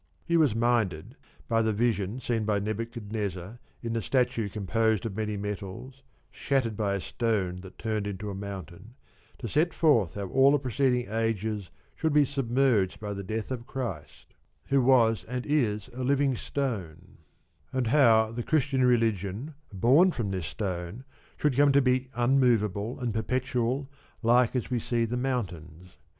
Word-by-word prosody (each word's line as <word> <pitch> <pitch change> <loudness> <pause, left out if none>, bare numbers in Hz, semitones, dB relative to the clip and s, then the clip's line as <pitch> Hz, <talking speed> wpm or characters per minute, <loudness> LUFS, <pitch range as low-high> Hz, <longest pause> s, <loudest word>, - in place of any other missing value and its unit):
He 170 - +1
was 150 -9 +4
minded, 115 - 0 0.3
by 115 -2 +2
the 110 -1 +1
vision 110 0 0
seen 115 -3 -1
by 105 -1 +1
Nebuchadnezzar 105 -2 -4 0.2
in 115 -1 -2
the 115 - -1
statue 120 -2 0
composed 110 +1 0
of 105 -4 -4
many 105 -1 -2
metals, 105 +6 -6 0.3
shattered 130 -5 -1
by 100 -2 0
a - - -2
stone 100 -4 -1
that 95 0 -13
turned 110 -2 -2
into 100 +1 -5
a - - -5
mountain, 100 +2 -8 0.4
to 120 - -5
set 160 - +1
forth 115 - +3
how 100 -1 -4
all 135 +5 +5
the - - +5
preceding 130 -2 0
ages 110 -2 -2 0.3
should 160 -2 0
be 150 -1 +5
submerged 125 -7 +1
by 105 -1 -4
the 100 - -5
death 110 +4 -4
of 120 -1 -5
Christ, 95 - -6 0.4
who 140 -1 +4
was 120 -5 +4
and 125 +1 -4
is 110 -9 0
a 130 +1 -4
living 140 0 +2
stone, 95 - -4 0.5
and 130 -1 0
how 115 -4 +4
the 120 +1 -4
Christian 135 -1 +1
religion, 115 - +1 0.2
born 130 - +5
from 115 - -3
this 90 -5 -3
stone, 95 - -4 0.3
should 150 -4 +1
come 145 +1 +5
to 140 - +6
be 130 -1 +1
unmovable 120 -4 +2
and 120 -4 -2
perpetual 125 +3 -1 0.4
like 120 +2 +4
as 125 0 -2
we 125 - +1
see 115 0 0
the 115 +2 -3
mountains. 90 - -4
115 Hz, 160 wpm, -28 LUFS, 100-130 Hz, 0.5 s, to